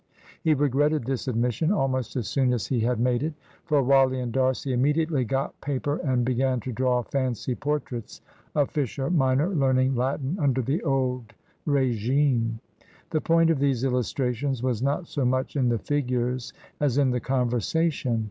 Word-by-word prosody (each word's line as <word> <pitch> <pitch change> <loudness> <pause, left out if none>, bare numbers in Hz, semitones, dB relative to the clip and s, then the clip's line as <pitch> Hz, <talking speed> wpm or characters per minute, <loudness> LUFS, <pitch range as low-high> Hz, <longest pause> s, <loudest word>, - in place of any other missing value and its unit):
He 155 -1 +3
regretted 145 0 +1
this 135 0 -3
admission 125 - 0
almost 130 - -1
as 120 -6 -2
soon 130 -3 +1
as 115 -6 -1
he 125 +1 -1
had 120 +1 0
made 120 0 +1
it. 155 +1 -2 0.3
For 145 -2 +2
Wally 135 0 +4
and 125 -2 -3
D'Arcy 130 +1 0
immediately 150 +2 +1
got 135 +4 -3
paper 145 +1 -2
and 125 -4 0
began 130 0 +1
to 130 - -5
draw 125 +1 +1
fancy 130 -2 -2
portraits 140 -4 -4 0.4
of 145 -2 +2
Fisher 140 0 -2
minor 135 0 +2
learning 130 -6 +2
Latin 135 +6 -1
under 135 -4 +1
the 140 +8 -1
old 130 -5 -1 0.3
regime. 125 -3 +1 0.5
The 155 - 0
point 165 0 +3
of 155 - 0
these 135 -3 +1
illustrations 125 0 -1
was 125 -4 0
not 140 +6 0
so 145 -4 -3
much 130 +3 0
in 130 -4 +2
the 120 - +1
figures 125 -2 -1 0.3
as 145 -3 +1
in 135 -3 +3
the 125 - 0
conversation. 125 - 0
130 Hz, 165 wpm, -26 LUFS, 125-145 Hz, 0.5 s, Wally